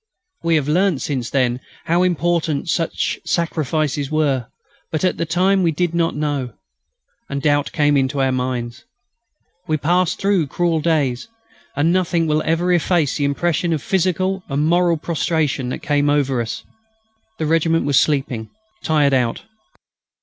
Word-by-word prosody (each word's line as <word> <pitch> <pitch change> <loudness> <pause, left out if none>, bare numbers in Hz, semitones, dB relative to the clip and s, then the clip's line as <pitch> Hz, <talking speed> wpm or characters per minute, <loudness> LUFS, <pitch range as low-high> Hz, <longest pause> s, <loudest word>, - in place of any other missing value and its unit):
We 165 -1 +2
have 145 -3 +1
learnt, 175 -1 +1
since 130 -5 -2
then, 125 -2 +1 0.3
how 170 +2 +2
important 170 -4 0
such 165 -1 -1
sacrifices 155 -4 -1
were. 140 -6 0 0.4
But, 155 - -2
at 185 - +1
the 165 - -2
time, 185 +4 +2
we 170 - +3
did 170 +2 -1
not 170 -1 0
know... 145 -4 -2 0.8
and 140 - -2
doubt 145 0 +1
came 145 -1 +2
into 135 +1 +1
our 135 -1 +2
minds. 125 0 -3 0.8
We 155 - +1
passed 175 +3 +1
through 195 -6 +1
cruel 170 +2 0
days, 145 - 0 0.5
and 160 +4 +2
nothing 175 -2 +1
will 155 0 +1
ever 170 +3 +2
efface 170 -3 +1
the 145 - 0
impression 170 +4 0
of 155 - -3
physical 190 +1 0
and 145 +2 0
moral 175 0 +3
prostration 155 -5 -1
that - - -2
overcame 145 -1 +2
us 145 -2 +2 0.4
then. - - -32 0.7
The 160 - -2
regiment 165 +1 +2
was 140 -2 +4
sleeping 135 -7 -1 0.3
tired 150 -3 +2
out. 125 -3 0
155 Hz, 150 wpm, -20 LUFS, 140-170 Hz, 0.8 s, was